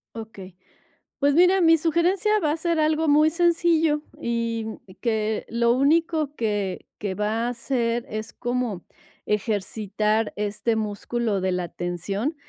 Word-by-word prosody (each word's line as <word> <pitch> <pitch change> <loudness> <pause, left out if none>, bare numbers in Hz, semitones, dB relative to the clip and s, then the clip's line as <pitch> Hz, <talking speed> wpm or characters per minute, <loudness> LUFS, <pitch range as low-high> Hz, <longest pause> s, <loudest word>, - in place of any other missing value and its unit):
Okey. 200 -5 -9 0.6
Pues 285 0 +3
mira, 360 +4 +5
mi 330 0 +6
sugerencia 355 +6 +2
va 310 -6 +1
a 310 - -1
ser 335 0 0
algo 310 +1 +2
muy 305 +1 +5
sencillo 330 -2 +2 0.2
y 230 -1 -1 0.4
que 220 -2 -1
lo 235 0 +2
único 305 +2 +1
que 205 -6 -2
que 200 -2 -2
va 215 +3 -1
a 245 - 0
hacer 240 -1 -1
es 215 +1 -5
como 240 -6 -2 0.4
ejercitar 210 +1 0
este 210 +2 -1
músculo 215 0 -2
de 190 0 0
la 180 0 -1
atención, 185 - -3
235 Hz, 135 wpm, -24 LUFS, 210-310 Hz, 0.6 s, mi